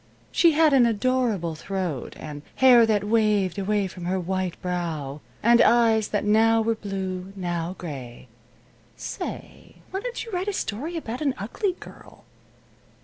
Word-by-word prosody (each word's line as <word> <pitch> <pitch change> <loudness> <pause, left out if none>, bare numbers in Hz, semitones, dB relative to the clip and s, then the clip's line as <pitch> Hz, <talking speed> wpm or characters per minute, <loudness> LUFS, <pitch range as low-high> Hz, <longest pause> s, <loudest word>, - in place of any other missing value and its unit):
She 335 -2 +4
had 310 -1 +4
an 250 -3 +6
'adorable 230 -6 0
throat' 175 -4 -4
and 150 -2 -8
hair 245 -3 +7
that 210 -2 +2
'waved 210 -4 +1
away 205 +1 0
from 180 -1 -7
her 185 +2 0
white 185 0 -2
brow,' 160 -6 -4 0.2
and 235 +1 +6
eyes 225 -2 +4
that 205 0 -1
'now 225 +2 +4
were 225 +1 +1
blue 190 -4 -4
and - - -15
now 175 -1 -3
gray.' 130 -8 -8 0.7
Say, - - -7 0.2
why 385 - -2
don't 485 +1 -5
you 455 - -10
write 370 +1 -2
a 410 - 0
story 310 - -3
about 245 -4 -5
an 280 -4 0
ugly 360 - -2
girl?" - - -14
210 Hz, 155 wpm, -25 LUFS, 180-240 Hz, 0.7 s, hair